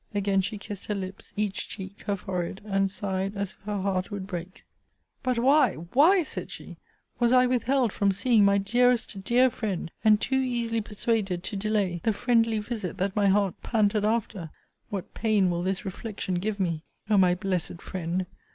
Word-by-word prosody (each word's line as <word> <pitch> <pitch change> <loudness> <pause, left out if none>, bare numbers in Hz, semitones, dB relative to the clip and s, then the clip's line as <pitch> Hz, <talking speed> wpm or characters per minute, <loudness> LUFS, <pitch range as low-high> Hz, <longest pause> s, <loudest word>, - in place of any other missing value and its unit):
Again 200 -1 +2
she 205 +3 -3
kissed 205 -1 -8
her 210 - -1
lips, 190 -1 -7
each 205 -2 -2
cheek, 195 0 -8
her 205 - +1
forehead; 185 -1 -4
and 195 -1 +1
sighed 195 0 -3
as 200 -1 -2
if - - -21
her 205 -1 -2
heart 185 -1 -1
would 200 -3 -5
break 180 -1 -7 0.6
But 255 -2 0
why, 260 -2 +4
why, 290 - +4
said - - -6
she, - - -10 0.4
was 240 -1 +3
I 255 0 +6
withheld 250 -1 +1
from 200 -1 +2
seeing 210 +2 +3
my 200 0 +5
dearest, 235 0 +1
dear 250 +4 +4
friend, 195 -8 -3
and 215 -1 +6
too 265 +4 +1
easily 235 -3 0
persuaded 210 -4 -1
to 215 - -4
delay, 195 -4 0
the 220 - +2
friendly 230 0 +2
visit 210 -4 -4
that 195 +1 -1
my 205 -1 +3
heart 195 -1 +3
panted 210 -2 +1
after; 215 -6 -1 0.4
what 195 -3 -5
pain 210 -5 +2
will 170 0 -1
this 190 +2 -2
reflection 195 0 -4
give 205 +2 -2
me! 170 -4 -1 0.3
O 215 - +3
my 185 -2 +5
blessed 180 -2 -2
Friend! 180 0 -3
200 Hz, 180 wpm, -27 LUFS, 190-225 Hz, 0.6 s, I